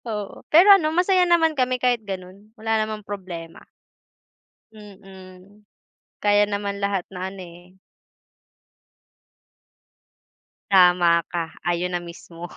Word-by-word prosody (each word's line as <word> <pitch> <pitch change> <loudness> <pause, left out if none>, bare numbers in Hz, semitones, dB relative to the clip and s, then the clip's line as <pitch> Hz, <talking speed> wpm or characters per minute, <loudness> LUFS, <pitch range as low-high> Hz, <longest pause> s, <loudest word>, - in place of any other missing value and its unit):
Oo, 210 -3 -6
pero 365 +6 +7
ano 335 -6 +3
masaya 360 +2 +2
naman 325 -2 +3
kami 255 -3 0
kahit 245 -2 0
ganun. 195 0 -9
Wala 225 +1 -2
namang 215 -1 -5
problema. 180 -5 -8 1.1
Mm, 195 -1 -16 0.5
kaya 205 0 +2
naman 200 0 -4
lahat 200 -2 -1
na 185 +1 -5
ano 195 - -13
eh 175 +2 -17 2.9
Tama 175 -3 +4
ka, 170 -2 -3 0.2
ayun 175 +1 -1
na - - -1
mismo. 170 0 -11
200 Hz, 110 wpm, -22 LUFS, 180-220 Hz, 2.9 s, pero